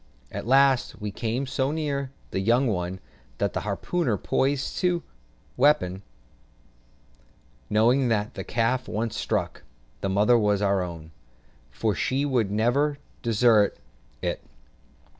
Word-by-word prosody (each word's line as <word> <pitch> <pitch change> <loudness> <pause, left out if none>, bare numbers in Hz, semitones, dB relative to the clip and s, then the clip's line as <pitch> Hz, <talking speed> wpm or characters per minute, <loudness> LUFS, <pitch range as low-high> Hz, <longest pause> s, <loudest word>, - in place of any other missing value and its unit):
At - - -5
last 135 0 +3
we 105 -1 -4
came 115 +6 -2
so 130 0 -1
near 145 -3 -2 0.2
the - - -1
young 120 +7 +3
one, 95 -4 -2 0.4
that - - -1
the - - -1
harpooner 155 - -1
poised 135 +7 -1
his 180 -1 +2 0.6
weapon, 125 -10 +3 1.7
knowing 120 +5 +3
that 110 0 0
the - - -5
calf 125 +2 0
once 110 +1 -2
struck, - - -2 0.4
the 95 - -2
mother 105 +5 +4
was 105 -2 +2
our 100 -1 +2
own, 85 -3 -7 0.6
for 105 - -1
she 135 +7 0
would 125 -7 +1
never 120 +8 +1 0.2
desert 115 -2 +3 0.5
it. - - -2
115 Hz, 125 wpm, -26 LUFS, 105-135 Hz, 1.7 s, mother